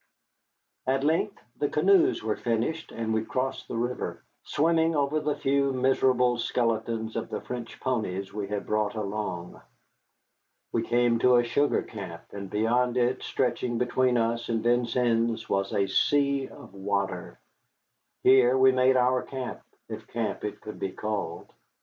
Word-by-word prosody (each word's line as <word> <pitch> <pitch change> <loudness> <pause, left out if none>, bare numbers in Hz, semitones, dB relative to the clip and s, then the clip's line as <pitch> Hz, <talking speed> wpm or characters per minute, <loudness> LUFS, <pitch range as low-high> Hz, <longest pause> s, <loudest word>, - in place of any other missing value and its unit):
At 135 +1 +1
length 160 +3 +1 0.2
the - - +1
canoes 380 -2 +3
were 110 - 0
finished 120 +8 -2
and 115 -1 -2
we 110 0 +1
crossed 130 +3 -3
the 115 - -4
river, 120 +2 -3 0.2
swimming 165 +1 +2
over 145 +1 +1
the 150 -1 -1
few 140 0 +1
miserable 125 -1 +2
skeletons 115 -2 -1
of 115 - -3
the - - -3
French 120 -2 -7
ponies 100 -7 -2
we 105 -1 -3
had 105 0 -3
brought 105 +1 0
along. 100 -4 -4 1.1
We 115 - +1
came 120 0 +2
to 125 +1 +5
a 120 - +5
sugar 140 +5 +1
camp, 95 -6 -8
and 100 -1 -7
beyond 120 +4 +1
it, 125 +1 +1
stretching 120 -1 -1
between 125 +1 +2
us 115 0 0
and 115 -1 0
Vincennes, 120 -1 +1
was 100 0 0
a 100 - +2
sea 140 +6 +2
of - - -13
water. 100 0 -3 0.8
Here 130 -1 +6
we 130 0 +6
made 130 0 +4
our 125 0 +3
camp, 130 -2 -6 0.3
if 110 -1 -8
camp 115 -2 -3
it 105 0 -5
could 105 - -8
be 95 -1 -3
called. 105 -5 -4
120 Hz, 150 wpm, -27 LUFS, 110-130 Hz, 1.1 s, Here